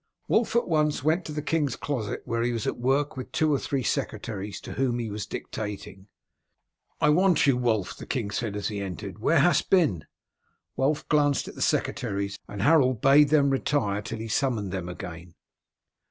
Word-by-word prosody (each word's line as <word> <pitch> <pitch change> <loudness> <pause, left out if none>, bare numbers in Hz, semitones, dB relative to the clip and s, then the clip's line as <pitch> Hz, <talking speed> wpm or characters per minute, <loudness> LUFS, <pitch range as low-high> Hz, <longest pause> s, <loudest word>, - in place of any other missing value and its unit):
Wulf 225 +1 +1
at 235 - +2
once 150 -4 +1
went 160 +4 +1
to - - -6
the 150 -1 -4
king's 150 -6 0
closet, 125 -8 -3
where 115 0 -1
he 120 +1 +1
was 115 -3 -3
at - - -2
work 135 +4 +1
with 130 -1 -7
two 155 -1 +2
or 140 - +1
three 135 -2 -2
secretaries, 105 -4 -3
to - - -8
whom 130 -3 0
he 115 -3 -3
was 105 0 -5
dictating. 105 -2 -6 0.9
"I 150 - +3
want 175 +1 +4
you, 140 -3 +4
Wulf," 115 -6 0
the - - -10
king 115 -7 -2
said 105 0 -3
as 105 - -2
he 105 -2 -4
entered. 95 +1 -6
"Where 165 +9 +3
hast 175 - +3
been?" 150 - +2 0.7
Wulf 145 +3 0
glanced 145 -2 +2
at - - -8
the - - -9
secretaries, 100 -3 -1
and 100 -1 -5
Harold 130 -5 +4
bade 140 +4 +6
them 140 -2 +4
retire 130 -7 0
till 115 +2 -6
he 110 +1 -5
summoned 110 -5 0
them 90 -2 -4
again. 85 -1 -8
120 Hz, 190 wpm, -26 LUFS, 105-145 Hz, 0.9 s, bade